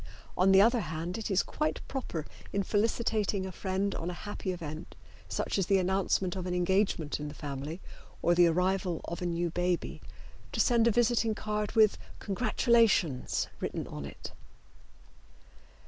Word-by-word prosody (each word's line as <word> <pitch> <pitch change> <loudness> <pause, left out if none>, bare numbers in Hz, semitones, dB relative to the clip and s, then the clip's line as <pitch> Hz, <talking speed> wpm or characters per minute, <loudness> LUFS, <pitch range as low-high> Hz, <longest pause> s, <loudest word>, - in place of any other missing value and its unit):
On 190 +1 +4
the 190 0 +8
other 235 +2 +4
hand 170 +1 -4
it 220 - -4
is 195 -1 +3
quite 305 +1 -2
proper 200 - -4 0.3
in 200 - 0
felicitating 210 -1 0
a 190 - -5
friend 190 +2 -1
on 165 - -3
a 180 - -5
happy 205 -2 -3
event, 160 -3 -7 0.3
such - - -1
as 185 - 0
the 195 - +4
announcement 190 0 +1
of 185 -1 -4
an 180 - -1
engagement 180 -4 +1
in 150 - -4
the 145 - -8
family 145 +4 -5 0.4
or 175 - +4
the 175 0 +6
arrival 180 0 +1
of 170 +2 -5
a 180 - -1
new 170 0 -1
baby, 175 0 -1 0.5
to - - -3
send 235 -2 +4
a - - +5
visiting 230 -1 +2
card 210 0 -2
with 220 -2 +4 0.2
"Congratulations" 210 - +2
written - - -3
on 75 -1 -7
it. 70 - -8
190 Hz, 160 wpm, -30 LUFS, 170-210 Hz, 0.5 s, the